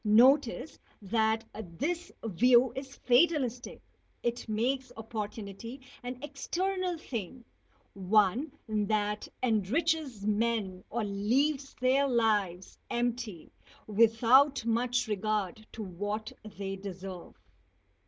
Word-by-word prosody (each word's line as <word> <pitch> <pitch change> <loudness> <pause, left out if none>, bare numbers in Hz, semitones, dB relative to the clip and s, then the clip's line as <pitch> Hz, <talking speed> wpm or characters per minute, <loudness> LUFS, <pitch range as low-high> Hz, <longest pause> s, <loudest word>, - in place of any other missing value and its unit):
Notice 250 +5 +4 0.2
that 220 +2 +1
this 285 - -4
view 240 +4 +4
is 270 0 -7
fatalistic; 255 -2 +2 0.4
it 240 -1 -2
makes 255 +5 0
opportunity 220 +2 -6 0.2
an 250 0 -5
external 360 +5 -2
thing 240 - -6 0.5
one 210 - +2 0.2
that 210 -1 0 0.2
enriches 255 - 0
men 210 -3 0
or 235 0 -1
leaves 260 +8 0
their 265 +2 +3
lives 210 -7 0
empty 240 -7 -2 0.3
without 230 +5 +4
much 240 +1 +1
regard 215 0 -2
to 220 - -5
what 205 +3 -4 0.2
they 195 -1 -3
deserve. 190 -2 -8
225 Hz, 95 wpm, -30 LUFS, 205-260 Hz, 0.5 s, Notice